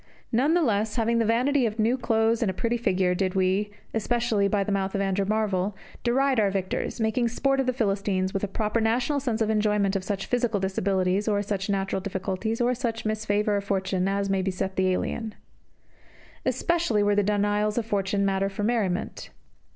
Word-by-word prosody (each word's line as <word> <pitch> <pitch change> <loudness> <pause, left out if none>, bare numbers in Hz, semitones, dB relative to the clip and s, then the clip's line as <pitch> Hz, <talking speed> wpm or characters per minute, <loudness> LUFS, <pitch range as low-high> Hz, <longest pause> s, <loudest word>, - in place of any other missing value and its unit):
None 275 +8 +3
the 350 - +3
less, 215 -4 0
having 230 0 +1
the 230 - +2
vanity 250 +3 +2
of 215 0 -5
new 225 +3 +2
clothes 225 -2 +1
and 225 - +2
a 190 - -3
pretty 235 +4 0
figure, 185 -6 +1
did 185 0 -1
we 190 +2 +1 0.2
especially 225 -2 +1
by 200 0 +1
the 205 - -3
mouth 195 -1 -1
of 200 - 0
Andrew 195 0 0
Marvell 205 -2 0 0.3
deride 260 +1 +2
our 205 -2 +3
victors, 190 +4 -3
making 225 +2 +1
sport 270 +3 0
of 265 - 0
the - - +3
Philistines 195 -5 -1
with 195 - -2
a - - +1
proper 215 +3 -1
national 245 +6 +1
sense 240 -4 -2
of 220 0 +2
enjoyment 210 -2 +1
of 195 - -1
such 195 0 -3
physical 240 -4 0
disabilities, 190 +1 0
or 205 -1 +1
such 200 -1 -3
natural 195 -1 -1
difficulties, 195 +3 -3
or 245 +1 +2
such 235 -2 -3
misfavour 210 -1 0
of 200 - -3
fortune, 190 -2 -1
as 200 0 0
may 195 -1 +1
beset 190 0 -2
the 190 0 +2
alien. 220 +4 -2 1.1
Especially 335 - +1
were 205 0 +3
the 205 - +3
denials 205 +1 +1
of 235 - 0
fortune 200 -2 0
matter 195 0 +1
for 200 +1 -5
merriment. 205 -5 -1
210 Hz, 195 wpm, -26 LUFS, 195-230 Hz, 1.1 s, None